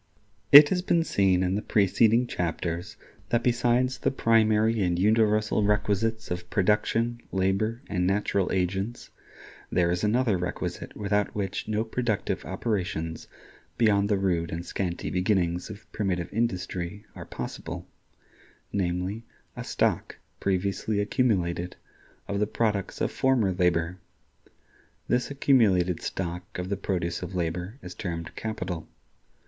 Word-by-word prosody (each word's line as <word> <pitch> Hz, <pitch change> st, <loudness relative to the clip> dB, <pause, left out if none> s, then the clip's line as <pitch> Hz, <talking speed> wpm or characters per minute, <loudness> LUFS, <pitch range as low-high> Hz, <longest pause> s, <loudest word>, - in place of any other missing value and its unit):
It 145 Hz, +1 st, +11 dB
has 180 Hz, -1 st, +1 dB
been 170 Hz, -2 st, +2 dB
seen 95 Hz, -, +2 dB
in 90 Hz, 0 st, 0 dB
the 105 Hz, -, 0 dB
preceding 110 Hz, +5 st, +3 dB
chapters 90 Hz, +1 st, -3 dB, 0.3 s
that 120 Hz, 0 st, +1 dB
besides 125 Hz, +1 st, +2 dB
the -, -, +1 dB
primary 110 Hz, -3 st, +3 dB
and 90 Hz, -2 st, +1 dB
universal 110 Hz, +2 st, +3 dB
requisites 105 Hz, +2 st, 0 dB
of 90 Hz, 0 st, -4 dB
production, 115 Hz, +4 st, +1 dB
labor 100 Hz, +6 st, 0 dB
and 90 Hz, -2 st, 0 dB
natural 100 Hz, -1 st, +1 dB
agents, 95 Hz, +5 st, -2 dB, 0.6 s
there 85 Hz, -1 st, +2 dB
is 90 Hz, +2 st, -1 dB
another 110 Hz, -2 st, +2 dB
requisite 90 Hz, 0 st, -4 dB
without 105 Hz, 0 st, 0 dB
which 95 Hz, -2 st, -3 dB
no 110 Hz, 0 st, 0 dB
productive 110 Hz, -4 st, -2 dB
operations 90 Hz, -5 st, -3 dB, 0.5 s
beyond 100 Hz, -3 st, +3 dB
the 105 Hz, -, +3 dB
rude 90 Hz, -4 st, 0 dB
and 85 Hz, +1 st, -4 dB
scanty 90 Hz, -2 st, -3 dB
beginnings 90 Hz, -1 st, 0 dB
of 105 Hz, 0 st, -10 dB
primitive 90 Hz, -4 st, -2 dB
industry 95 Hz, -3 st, -2 dB
are -, -, -8 dB
possible—namely, 95 Hz, +3 st, -6 dB, 0.3 s
a -, -, -5 dB
stock, -, -, -1 dB, 0.2 s
previously 100 Hz, +2 st, 0 dB
accumulated, 90 Hz, -6 st, 0 dB, 0.5 s
of 100 Hz, -, -2 dB
the 105 Hz, -, +1 dB
products 105 Hz, -4 st, -1 dB
of -, -, +1 dB
former 125 Hz, -7 st, +2 dB
labor. 90 Hz, -1 st, +1 dB, 1.1 s
This 125 Hz, 0 st, +1 dB
accumulated 105 Hz, -, +3 dB
stock 90 Hz, 0 st, -5 dB
of 90 Hz, +1 st, -4 dB
the 100 Hz, -, 0 dB
produce 90 Hz, -3 st, -2 dB
of 90 Hz, +1 st, -6 dB
labor 90 Hz, +5 st, -3 dB
is 90 Hz, 0 st, -7 dB
termed 85 Hz, -3 st, -5 dB
Capital. 90 Hz, -7 st, -4 dB
100 Hz, 125 wpm, -27 LUFS, 90-110 Hz, 1.1 s, It